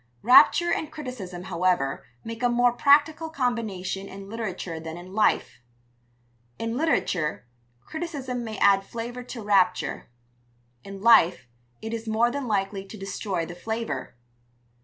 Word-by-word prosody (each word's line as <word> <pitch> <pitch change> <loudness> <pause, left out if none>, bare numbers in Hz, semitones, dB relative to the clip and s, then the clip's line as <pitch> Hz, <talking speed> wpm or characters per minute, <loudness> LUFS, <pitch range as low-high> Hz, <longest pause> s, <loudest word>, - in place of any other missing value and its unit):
Rapture 245 +8 +6
and 310 - -3
criticism, 245 - -7
however, 180 -6 0 0.2
make 230 +1 -7
a 245 - +3
more 245 0 +3
practical 295 +5 +3
combination 220 - -2
in 195 0 -9
literature 190 -7 -5
than 160 +1 -7
in 180 +2 -11
life. 215 - +1 1.0
In 230 0 -3
literature, 180 - 0 0.4
criticism 280 -7 -4
may 220 -2 -6
add 195 -1 +4
flavour 235 +4 -6
to 245 -2 -8
rapture; 190 -7 +1 0.7
in 195 0 -9
life 215 - +5 0.4
it 220 +1 -4
is 230 0 -5
more 225 +2 +2
than 280 -1 -4
likely 195 -2 -1
to 195 +3 -11
destroy 195 -3 -3
the 175 - -8
flavour. 220 - -4
220 Hz, 135 wpm, -26 LUFS, 190-245 Hz, 1.0 s, Rapture